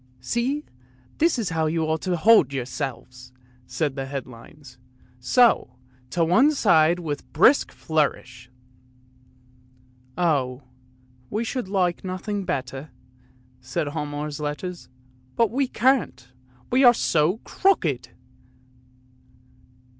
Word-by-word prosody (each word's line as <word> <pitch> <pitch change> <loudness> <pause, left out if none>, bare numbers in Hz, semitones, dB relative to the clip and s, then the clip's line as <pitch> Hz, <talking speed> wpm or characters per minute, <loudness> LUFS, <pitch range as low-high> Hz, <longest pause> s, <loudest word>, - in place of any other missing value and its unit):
" - - -34
See, 270 +6 -1 0.5
this 330 -1 +3
is 220 -5 -2
how 160 -1 0
you 160 +1 0
ought 160 0 -1
to 180 -2 -1
hold 185 - +5
yourselves! 125 -1 -6 0.2
" 125 0 -31
said 150 -4 -2
the 135 -1 -4
headlines, 130 0 -10 0.2
" 125 0 -31
so 235 - +3 0.2
— 125 0 -32
to 170 +2 +1
one 260 - +4
side 170 - +4
with 155 -5 -4
a - - -29
brisk 240 - +3
flourish! 130 -6 -2 0.6
" 125 0 -32 0.2
" 125 0 -32
Oh, 140 -6 0 0.7
we 215 +2 -2
should 245 -2 -4
like 185 -3 0
nothing 190 +2 -4
better," 135 -3 -4 0.7
said 130 +3 -3
Hialmar's 150 -1 -5
letters, 150 +4 -5 0.2
" 125 0 -33
but 230 -3 +3
we 270 +2 0
can't, 245 - 0 0.4
we 260 +2 +4
are 245 -1 +7
so 165 0 +1
crooked! 160 - 0
155 Hz, 130 wpm, -24 LUFS, 130-195 Hz, 0.7 s, are